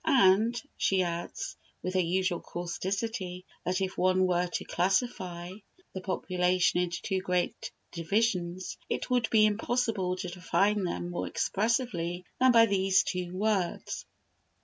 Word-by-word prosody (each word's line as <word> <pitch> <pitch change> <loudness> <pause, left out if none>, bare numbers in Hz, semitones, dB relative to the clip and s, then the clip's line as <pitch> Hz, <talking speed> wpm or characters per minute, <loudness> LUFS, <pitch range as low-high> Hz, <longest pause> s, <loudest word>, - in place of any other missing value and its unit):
And, 235 -5 +4 0.2
she 190 -1 +2
adds, 170 0 -4 0.3
with 185 - -2
her 185 - +2
usual 180 0 +1
causticity, 185 +1 -4 0.2
that 180 +2 -1
if 190 0 -2
one 185 0 +4
were 180 0 +1
to 175 - -4
classify 180 -2 -1 0.4
the 190 - -5
population 180 -1 +1
into 175 -1 -2
two 190 -2 0
great 180 -1 -1 0.2
divisions, 180 0 -1
it - - -2
would 245 -2 +2
be 215 -1 +5
impossible 215 -3 0
to 185 - -5
define 195 +3 +1
them 175 0 -3
more 175 - -3
expressively 195 -6 -1
than 255 0 +6
by 230 -1 +7
these 195 -2 +3
two 180 -2 -3
words. 200 -3 -1
185 Hz, 135 wpm, -29 LUFS, 180-210 Hz, 0.4 s, by